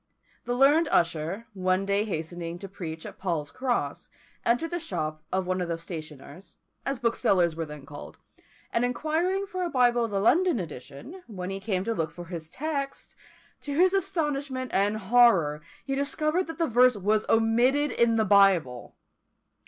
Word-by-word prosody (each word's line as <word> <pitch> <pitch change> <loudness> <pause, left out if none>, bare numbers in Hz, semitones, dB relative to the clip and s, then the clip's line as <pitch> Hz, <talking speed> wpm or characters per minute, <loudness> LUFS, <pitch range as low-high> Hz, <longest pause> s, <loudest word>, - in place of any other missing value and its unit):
The 245 - -1
learned 290 +5 +5
Usher, 170 +6 0
one 185 0 0
day 200 +1 +1
hastening 170 -2 -5
to 195 - -8
preach 165 -5 -7
at - - -10
Paul's 165 -6 -2
Cross, 255 -2 -2 0.3
entered 245 +8 +1
the 345 - -1
shop 155 - -4
of 190 0 0
one 185 0 -1
of 175 - -2
the 170 -1 -2
stationers, 160 0 -9 0.3
as 275 0 -1
booksellers 185 -8 +2
were 165 -1 -4
then 150 -2 -10
called, 145 +1 -10 0.6
and 230 - +2
inquiring 320 +10 0
for 370 -2 -5
a 355 - -1
Bible 245 -4 +3
of - - -5
the 200 -1 -1
London 340 - +3
edition, 150 - -9
when 190 -4 -6
he 195 - -4
came 195 -2 -1
to 230 - -1
look 160 -7 -1
for 175 - -10
his 165 -2 -7
text, 280 - -4 0.5
to 285 -1 -4
his 365 +4 +4
astonishment 290 - -1
and 205 +2 +2
horror 190 -9 +4 0.2
he 270 - -2
discovered 305 +5 0
that 325 - -7
the 335 - +1
verse 250 -2 +4
was 210 +2 0
omitted 240 +6 +3
in 235 -1 +2
the 220 -1 +2
Bible! 185 - +3
215 Hz, 170 wpm, -27 LUFS, 175-275 Hz, 0.6 s, learned